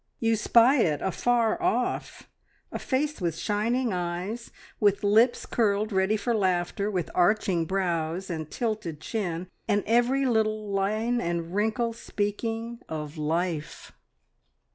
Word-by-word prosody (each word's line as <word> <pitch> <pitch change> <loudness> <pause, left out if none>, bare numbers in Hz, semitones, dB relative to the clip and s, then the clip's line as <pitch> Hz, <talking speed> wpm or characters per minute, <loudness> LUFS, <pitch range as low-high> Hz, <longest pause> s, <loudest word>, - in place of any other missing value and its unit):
You 225 -1 +2
spy 235 +5 +5
it 155 - +2
afar 235 - +1
off 360 +1 -1 0.4
a - - -4
face 290 -1 -1
with 170 -2 -1
shining 225 +4 0
eyes, 180 +6 -3 0.3
with 205 -2 +2
lips 220 +4 +4
curled 215 -1 +1
ready 190 +2 +2
for 235 +3 -1
laughter, 190 0 0
with 185 -5 -2
arching 180 -2 +2
brows, 175 -1 -1
and 160 -3 -4
tilted 215 -10 -3
chin, 180 -2 -3 0.2
and 205 0 +2
every 245 +4 +3
little 215 -3 +1
line 215 +5 0
and 170 0 -2
wrinkle 220 +3 0
speaking 225 +2 -3
of 150 -1 -5
life. 160 0 -2
205 Hz, 125 wpm, -27 LUFS, 175-230 Hz, 0.4 s, spy